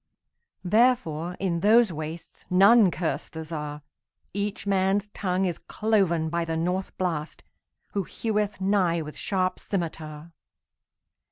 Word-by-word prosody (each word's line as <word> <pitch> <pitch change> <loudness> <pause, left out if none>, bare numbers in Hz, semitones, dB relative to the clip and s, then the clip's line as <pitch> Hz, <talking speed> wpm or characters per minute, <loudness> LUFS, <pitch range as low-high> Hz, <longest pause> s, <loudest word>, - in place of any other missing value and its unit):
Therefore, 180 -6 +2
in 180 -3 0
those 220 +2 +5
wastesNone 180 +6 +3
curse 160 -2 -2
the 160 0 -6
Czar.Each 155 +6 -6
man's 195 +1 +1
tongue 190 -2 -1
is 175 -3 -2
cloven 185 -7 +1
byThe 165 -1 -1
North 180 +3 -2
Blast, 165 -4 -2 0.5
who 200 - +1
heweth 210 -1 -2
nighWith 180 -5 0
sharp 185 -2 -1
scymitar. 160 -4 -5
180 Hz, 100 wpm, -26 LUFS, 160-200 Hz, 0.5 s, those